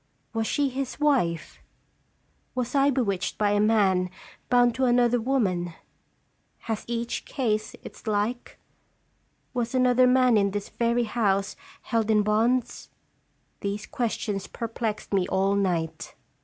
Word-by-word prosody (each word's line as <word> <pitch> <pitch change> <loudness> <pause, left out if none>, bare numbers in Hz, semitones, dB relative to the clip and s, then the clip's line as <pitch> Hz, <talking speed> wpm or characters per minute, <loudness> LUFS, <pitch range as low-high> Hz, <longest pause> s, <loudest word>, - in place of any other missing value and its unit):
Was 225 -1 -1
she 285 -2 +1
his 265 +1 -4
wife? 245 - 0 0.9
Was 250 -1 -2
I 280 0 +4
bewitched 200 -9 -1
by 205 -1 +2
a 205 - +2
man 200 -4 +3 0.4
bound 245 -1 +4
to 260 +2 0
another 240 -1 +3
woman? 185 -10 0 0.9
Has 220 -2 -4
each 235 0 -3
case 215 -5 -2
its - - -12
like? 215 +4 -2 1.0
Was 245 0 -2
another 255 0 +4
man 250 -2 +4
in 200 -1 +3
this 205 0 -4
very 235 +1 +1
house 205 -3 0 0.3
held 225 -2 0
in 210 -1 +4
bonds? 230 +4 0 0.7
These 200 +1 -3
ques 235 -3 -2
tions 195 -3 -3
perplexed 225 -2 -4
me 190 -2 +2
all 195 +1 +1
night. 180 -5 -1
225 Hz, 130 wpm, -26 LUFS, 200-245 Hz, 1.0 s, I